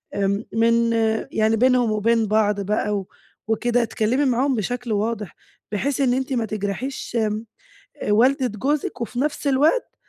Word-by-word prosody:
آمم 200 +2 0
من 230 +1 +3 0.4
يعني 220 +1 +2
بينهُم 250 -1 +3
وبين 225 +2 +2
بعض 210 -1 +2
بقى 210 +1 0
و 195 -2 -5 0.4
وكده، 240 +2 +1
اتكلّمي 225 +5 0
معاهم 260 +1 +1
بشكل 240 +3 -3
واضح، 210 -3 -2 0.4
بحيث 270 +7 -1
إن 255 -3 +3
أنتِ 265 +1 -2
ما 235 -3 0
تِجرَحيش 215 +6 -4
آمم، 215 0 -1 0.6
والَدة 255 +5 +3
جوزِك، 265 +6 -2
وفي 240 +1 -4
نفْس 290 +1 -1
الوقت 295 - +2
230 Hz, 145 wpm, -22 LUFS, 215-255 Hz, 0.6 s, من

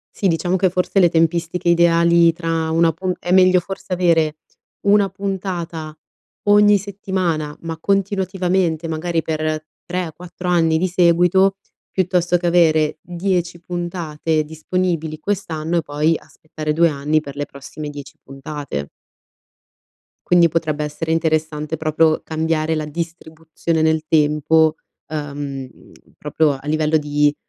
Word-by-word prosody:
Sì, 200 - -1
diciamo 180 +1 +1
che 185 0 +2
forse 185 +2 0
le 175 - +6
tempistiche 170 +1 0
ideali 170 0 +4
tra 165 -1 -2
1 165 0 +3
pu 185 +3 -2
è 175 - -6
meglio 185 -1 +6
forse 190 0 -8
avere 165 -4 +2 0.4
1 200 0 +3
puntata 180 -5 -5 0.5
ogni 205 0 +5
settimana, 185 -6 -3
ma 165 -1 -5
continuativamente, 185 -3 0
magari 165 +1 -1
per 155 0 -2 0.2
3 180 0 -3
o 160 - -11
4 180 +1 -8
anni 165 -2 +3
di 185 - 0
seguito, 180 +2 +3 0.3
piuttosto 180 -2 +1
che 175 - -2
avere 160 -3 +3
10 175 -1 -2
puntate 165 -3 -2
disponibili 160 0 -2
quest'anno, 170 -4 -2
e - - 0
poi 150 +2 +1
aspettare 155 0 -6
2 170 +2 +4
anni 150 +1 0
per 140 -2 -10
le 145 - -2
prossime 145 +2 -8
10 145 -1 -10
puntate. 135 - -6 1.4
Quindi 175 -1 +5
potrebbe 155 -2 -1
essere 160 +2 -3
interessante 155 -1 -1
proprio 155 0 +2
cambiare 160 0 -1
la 155 -1 -2
distribuzione 160 0 -4
nel 160 0 +2
tempo, 155 +1 +3 0.3
uhm, 145 -3 -5 0.5
proprio 150 0 +1
a 135 +1 -9
livello 155 +1 +1
di, 145 0 +1
165 Hz, 130 wpm, -20 LUFS, 155-180 Hz, 1.4 s, le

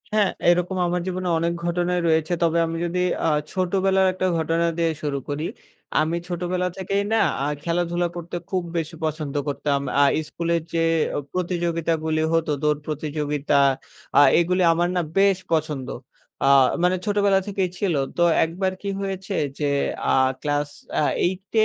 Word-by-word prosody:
হ্যাঁ, 210 -2 +3 0.2
এরকম 180 +2 +2
আমার 175 0 -1
জীবনে 185 0 -2
অনেক 170 +1 0
ঘটনাই 175 +1 0
রয়েছে 160 +1 +2
তবে 165 0 +2
আমি 165 0 -3
যদি 175 +1 -2 0.3
আ - - +4 0.2
ছোটবেলার 190 +1 +2
একটা 185 0 -1
ঘটনা 165 +1 +1
দিয়ে 165 -1 +2
শুরু 145 -2 -1
করি। 145 +2 -2 0.6
আমি 160 +2 0
ছোটবেলা 180 +1 -1
থেকেই 195 +1 -1
না 225 - +3 0.2
আ - - 0 0.2
খেলাধুলা 175 +1 0
করতে 175 0 -6
খুব 185 -2 -1
বেশি 165 0 -3
পছন্দ 155 -2 -3
করতাম 145 0 0 0.2
আ - - +7 0.2
স্কুলের 170 +1 -1
যে 165 -1 +2 0.5
প্রতিযোগিতা 170 -2 -1
গুলি 155 0 0
হতো 165 -2 +1
দৌড় 150 -1 +2
প্রতিযোগিতা 150 -1 -1 0.6
আ - - +9 0.2
এগুলি 180 +2 +2
আমার 175 +1 +1
না 180 - +2 0.2
বেশ 195 -1 +5 0.2
পছন্দ। 150 -5 -1 0.6
আ - - +4 0.4
মানে 180 +1 +3
ছোটবেলা 200 -1 +3
থেকেই 195 -2 -1
ছিল 195 -4 +1 0.2
তো 175 - +3 0.2
একবার 185 +4 -2
কি 200 - -3
হয়েছে 195 0 -4 0.2
যে 145 -1 +1 0.4
আ - - +3 0.3
ক্লাস 145 -1 -1 0.3
অ্যা 150 - +2 0.2
8 185 +2 -6
170 Hz, 155 wpm, -23 LUFS, 160-185 Hz, 0.6 s, আ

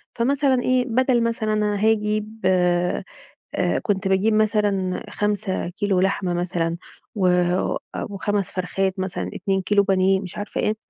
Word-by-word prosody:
فمثلًا 265 +1 +2
إيه 255 0 +2
بدل 245 0 +2
مثلًا 220 -2 -1
أنا 210 -1 +1
هاجيب 215 0 0
آآ، 180 -1 +2 0.8
كنت 195 -1 0
باجيب 200 +3 +2
مثلًا 205 -4 +1
5 205 -3 -1
كيلو 195 0 0
لحمة 185 -1 0
مثلًا، 175 -1 -1 0.4
و 190 -3 +1
أ 180 0 +1 0.3
و5 205 0 -1
فرخات 190 +1 -1
مثلًا، 185 -1 -3
2 190 0 -1
كيلو 200 +1 +3
بانيه، 190 -1 +2
مش 185 -2 -8
عارفة 205 - -3
إيه، 215 +1 0
200 Hz, 140 wpm, -23 LUFS, 185-215 Hz, 0.8 s, كيلو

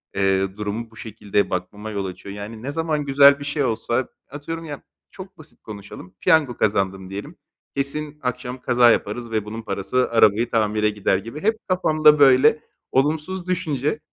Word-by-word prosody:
eee, 95 0 +1
durumu 105 +2 -4
bu - - -18
şekilde 105 -2 -2
bakmama 105 +4 -5
yol 100 -2 -3
açıyor. 95 +2 -8
Yani 110 +2 -8
ne 140 - -3
zaman 155 -1 -1
güzel 140 0 +6
bir 145 - -7
şey 145 +1 -1
olsa, 120 +1 -1 0.2
atıyorum, 165 +4 -6
ya, 145 -3 -8 0.3
çok 190 0 -11
basit 155 0 -17
konuşalım, 100 -3 -10
piyango 145 -7 +3
kazandım 95 -2 0
diyelim, 100 +1 -7 0.4
"Kesin 150 +2 -2
akşam 125 0 -4
kaza 120 -1 +5
yaparız 115 +2 -2
ve 110 -2 -1
bunun 110 +2 -6
parası 110 +5 -1
arabayı 115 +1 +4
tamire 105 -1 +1
gider." 105 -2 0
gibi 115 +10 -8
hep, 220 +1 +2
kafamda 155 -5 +4
böyle 140 +2 +6 0.3
olumsuz 155 +7 0
düşünce. 165 - -1
120 Hz, 160 wpm, -22 LUFS, 105-150 Hz, 0.4 s, güzel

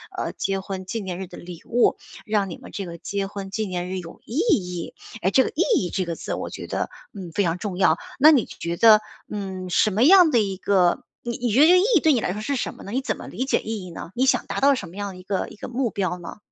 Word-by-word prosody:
呃， - - -2
结 195 0 -1
婚 190 -1 -6
纪 225 +4 -3
念 185 -3 -5
日 190 - -4
的 180 - -11
礼 175 -1 -10
物， 240 +1 +2 0.3
让 205 -3 0
你 - - -7
们 - - -12
这 200 - -4
个 170 -1 -8
结 200 -1 -3
婚 195 -1 -7
纪 215 +2 -2
念 180 -1 -4
日 190 - -3
有 170 -2 -9
意 230 - -8
义。 190 - 0 0.3
诶， 190 - +2
这 260 - +5
个 - - -2
意 335 - +1 0.2
义 180 - -2
这 185 0 -1
个 170 -1 -3
字 - - -4
我 - - -5
觉 - - -7
得， - - -3 0.2
嗯， 180 -4 -7
非 205 - +1
常 170 0 0
重 185 -2 -5
要。 - - +4 0.2
那 300 +3 +9
你 265 -7 +4
觉 170 0 -5
得， 220 -2 +7 0.3
嗯， 190 -3 -5
什 215 - +4
么 215 +4 +1
样 360 +1 +8
的 245 -6 +3
一 195 -3 0
个 185 -2 +2 0.2
你 240 - -3
你 240 -2 0
觉 250 +7 +4
得 305 - +9
这 350 - +7
个 365 - +7
意 - - +3
义 345 - +7
对 315 0 +4
你 240 - +1
来 - - -1
说 210 - -5
是 280 +2 -1
什 - - -3
么 - - -12
呢？ 200 - -8
你 260 +4 0
怎 - - -2
么 - - -9
理 260 - -3
解 265 - +2
意 220 -3 -4
义 180 - -9
呢， 165 0 -8
你 260 +5 +1
想 - - +2
达 - - -3
到 280 0 +5
什 200 -9 -6
么 170 - -13
样 205 -1 -3
的 185 - -10
一 185 - -12
个 195 0 -2
一 - - -12
个 - - -7
目 245 0 -1
标 185 -4 -2
呢？ 175 - -9
200 Hz, 320 characters per minute, -23 LUFS, 185-240 Hz, 0.3 s, 那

